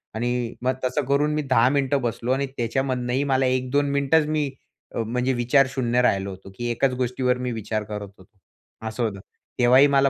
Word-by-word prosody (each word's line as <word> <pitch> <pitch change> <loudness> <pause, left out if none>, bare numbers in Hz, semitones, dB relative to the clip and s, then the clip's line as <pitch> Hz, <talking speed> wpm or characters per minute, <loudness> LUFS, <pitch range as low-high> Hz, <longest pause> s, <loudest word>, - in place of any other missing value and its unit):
आणि 120 0 -1
मग 130 +1 +2
तसं 130 +4 0
करून 145 +3 +2
मी 150 - 0
10 130 -4 +3
मिनिटं 140 0 +1
बसलो 120 0 -2
आणि 135 +1 +1
त्याच्यामधनंही 125 +1 -1
मला 135 -2 +2
1-2 130 +3 +1
मिनिटच 140 +3 +3
मी, 150 -2 0 0.5
अ, - - -1
म्हणजे 125 +3 0
विचार 125 +3 +3
शून्य 125 -2 +1
राहिलो 100 -5 +1
होतो 95 0 -10
की 120 +4 -3
एकाच 130 +3 +1
गोष्टीवर 125 0 0
मी 125 0 -3
विचार 110 -1 -3
करत 105 -1 -6
होतो. 95 0 -19 0.6
असं 110 +2 -3
होतं. 105 -3 -2 0.4
तेव्हाही 125 +3 +6
मला 140 -1 +4
125 Hz, 185 wpm, -24 LUFS, 120-135 Hz, 0.6 s, तेव्हाही